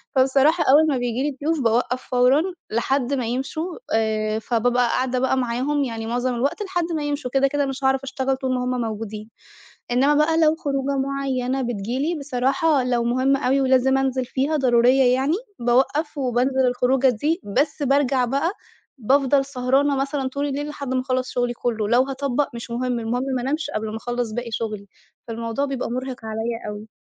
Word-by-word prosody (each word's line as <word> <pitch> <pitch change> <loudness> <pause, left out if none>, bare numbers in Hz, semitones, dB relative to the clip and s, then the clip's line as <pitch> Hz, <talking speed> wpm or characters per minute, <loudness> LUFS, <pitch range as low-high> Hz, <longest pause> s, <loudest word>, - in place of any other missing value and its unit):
فبصراحة 270 +5 +4
أول 310 +3 +6
ما 270 - +1
بييجي 245 +1 -1
لي 290 -2 -2
ضيوف 320 0 +1
باوَقّف 245 +2 +1
فورًا، 250 +4 +4 0.3
لحد 260 +3 0
ما 255 -4 -1
يمشوا، 275 +8 -3 0.2
آآ 220 -1 0
فبابقى 245 +2 +1
قاعدة 255 +1 0
معاهم، 260 +4 0
يعني 225 -3 -4
معظم 245 +1 -1
الوقت 280 - -1
لحد 355 -3 -1
ما 300 - -2
يمشوا، 290 -3 -3
كده 275 0 +4
كده 285 0 0
مش 270 0 -5
هاعرف 265 0 +2
أشتَغل 265 0 -1
طول 260 -1 -2
ما 250 - -1
هُمّ 250 -1 -1
موجودين. 215 -1 -5 0.6
إنما 270 +4 +3
بقى 320 +2 +3
لو 310 0 +4
خروجة 275 -2 -2
معينة 270 -1 -1
بتيجي 235 +1 -3
لي، 315 +3 -1
بصراحة 275 +1 +1
لو 240 -2 0
مُهمة 260 +3 +1
أوي 270 +2 +3
ولازم 265 0 +3
أنزل 265 -1 0
فيها، 280 +5 -1
ضرورية 250 0 +4
يعني، 270 +5 +1 0.2
باوَقّف، 270 +6 +1
وبانزل 260 +1 +1
الخروجة 250 +2 +2
دي، 300 - 0
بس 285 +8 -1
بارجع 275 -2 +2
بقى، 275 +8 0 0.5
بافضل 270 +3 +3
سهرانة 275 +1 +1
مثلًا 275 0 -1
طول 280 +2 -3
الليل 290 +1 -3
لحد 280 -3 -5
ما 255 - +2
أخَلّص 255 -1 -2
شغلي 245 -1 0
كله، 225 -3 -2
لو 245 +2 +4
هاطَبّق 275 +1 -1
مش 235 0 -7
مهم، 245 0 -1
المهم 240 +3 -2
ما 245 - -2
أنامش 295 +3 -2
قبل 215 -4 -3
ما 220 - -5
أخلص 240 -1 -3
باقي 240 0 -4
شغلي. 215 -2 -4 0.4
فالموضوع 230 +3 -2
بيبقى 270 -4 -3
مُرهق 255 -2 -5
عليَّ 220 +1 -3 0.2
أوي. 210 +1 -7
260 Hz, 180 wpm, -22 LUFS, 245-275 Hz, 0.6 s, أول